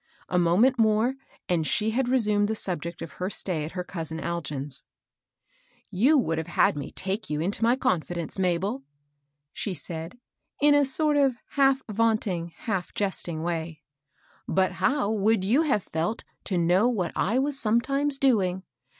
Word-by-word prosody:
A 180 - +2
moment 210 +10 +3
more, 220 +3 +3 0.3
and 165 -3 +1
she 215 +1 +1
had 245 +2 0
resumed 210 -5 +2
the 220 - -1
subject 170 -4 -3
of 160 - -8
her 185 +5 -4
stay 175 -6 0
at 160 - -8
her 180 -1 -3
cousin 160 -3 -4
Algin's. 145 -5 -4 0.6
*' - - -39 0.3
You 250 +11 +4
would 165 - 0
have 160 - -5
had 170 - +2
me 145 - -5
take 195 +3 -4
you 150 0 -1
into 190 +6 -2
niy 240 +3 +3
confidence, 170 - -2
Mabel? 180 -4 0 0.4
" - - -51 0.3
she 195 - -3
said, 165 +4 -6 0.4
in 290 +1 +5
a 290 -1 +4
soak 295 +2 +2
of 270 -3 +3 0.2
half 270 -1 +3
vaunting, 215 -6 0
half 195 -5 -3
jesting 175 -5 -2
way; 165 -2 -4 0.3
" - - -40 0.3
but 190 0 +2
how 255 -6 0
would 215 -1 +2
you 235 +10 +3
have 275 - +1
felt 165 +8 -3 0.2
tp 185 -3 0
know 180 +6 +3
what 190 -8 -1
I 225 +6 +1
was 275 +1 0
sometimes 275 +5 +1
doing 190 -9 +2
195 Hz, 170 wpm, -26 LUFS, 170-245 Hz, 0.6 s, in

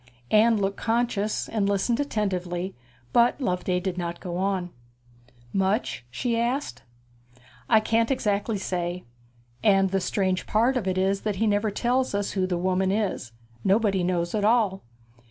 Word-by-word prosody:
Anne 220 +1 +5
looked 195 -1 -1
conscious, 225 -2 0
and 205 -3 0
listened 200 +5 +1
attentively; 190 -8 -2 0.4
but 240 +4 +4
Loveday 180 -6 0
did 180 0 -3
not 170 0 -4
go 175 -2 -5
on. 185 -1 -1 0.8
'Much?' 195 - 0
she 230 - -1
asked. 250 +5 -2 0.9
'I 220 -2 +6
can't 230 +1 +1
exactly 210 -4 0
say. 180 -1 -3 0.6
And 195 -3 +4
the 195 0 +1
strange 185 0 -1
part 235 +5 +2
of 230 -7 -1
it 185 0 0
is 195 +1 +1
that 210 -2 -2
he 225 - 0
never 210 0 +2
tells 245 +3 0
us 200 0 -1
who 185 -2 0
the 180 -1 -1
woman 185 +1 +1
is. 195 - -2 0.3
Nobody 195 -2 +2
knows 175 -1 -1
at 210 -2 0
all.' 210 -3 +2
200 Hz, 155 wpm, -25 LUFS, 185-225 Hz, 0.9 s, I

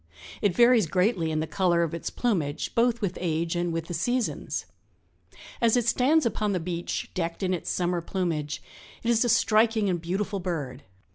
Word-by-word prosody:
It 200 -4 +2
varies 235 -4 +5
greatly 180 0 +1
in 155 0 -1
the - - -1
color 175 0 +2
of 165 - -3
its 170 - -4
plumage, 160 -11 -1
both 235 0 +2
with 190 -3 -2
age 165 0 -1
and 175 0 0
with 165 -1 -3
the 175 - -6
seasons. 245 +8 -1 1.0
As 235 0 +4
it 240 - +1
stands 265 +6 +3
upon 210 -3 0
the 185 - 0
beach, 175 0 -4
decked 170 +1 -3
in 185 0 +1
its 175 - -3
summer 175 -1 0
plumage, 165 -4 -3 0.4
it 235 - +2
is 230 0 +3
a 240 - 0
striking 220 -2 +3
and 175 -2 -2
beautiful 195 +4 -2
bird. 150 -8 -4
180 Hz, 185 wpm, -27 LUFS, 165-225 Hz, 1.0 s, varies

